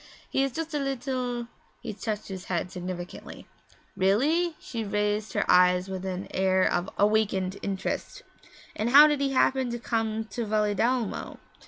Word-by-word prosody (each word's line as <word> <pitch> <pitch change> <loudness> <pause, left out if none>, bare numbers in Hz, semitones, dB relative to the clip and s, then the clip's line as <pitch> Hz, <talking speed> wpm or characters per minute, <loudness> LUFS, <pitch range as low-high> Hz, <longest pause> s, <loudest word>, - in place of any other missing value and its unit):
He - - +2
is 275 - 0
just 325 +3 -5
a 295 - 0
little 255 -3 -2 0.2
' - - -37
He - - -4
touched 215 0 -4
his 190 -2 -7
head 180 0 -2
significantly. 180 0 -7 0.5
'Really?' 300 - +2
She 230 -3 -5
raised 210 +1 -1
her 205 - +1
eyes 180 +1 +4
with 190 0 -4
an 185 +1 -4
air 190 0 +2
of 175 0 +1
awakened 200 -2 +1
interest. 200 - -4 0.5
'And 220 +3 -1
how 285 +4 +10
did 295 -2 +1
he 275 -1 0
happen 260 -1 +2
to 240 - -3
come 225 -2 -2
to 240 - -3
Valedolmo?' 215 +2 0
215 Hz, 160 wpm, -27 LUFS, 190-255 Hz, 0.5 s, how